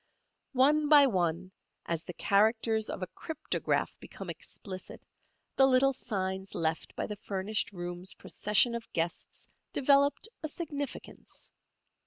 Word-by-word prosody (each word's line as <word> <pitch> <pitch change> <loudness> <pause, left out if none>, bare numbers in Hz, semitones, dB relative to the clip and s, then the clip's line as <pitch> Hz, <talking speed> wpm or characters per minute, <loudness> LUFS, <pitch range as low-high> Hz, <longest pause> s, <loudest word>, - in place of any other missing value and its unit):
One 295 +3 +4
by 295 -2 +9
one, 185 -5 0 0.3
as 165 -1 -2
the 180 - -8
characters 220 +3 +2
of 190 - -4
a - - -3
cryptograph 315 -1 -1
become - - -7
explicit, 185 -3 -9 0.5
the 270 - +6
little 270 +1 +4
signs 190 -6 -3
left 160 -1 -2
by - - -2
the 210 - -5
furnished 200 +2 -2
room's 175 0 -5
procession 210 +3 +3
of 235 -1 -6
guests 170 +2 -3 0.3
developed 280 +6 +4
a 310 - -2
significance. 290 -3 -5
215 Hz, 125 wpm, -31 LUFS, 185-270 Hz, 0.5 s, by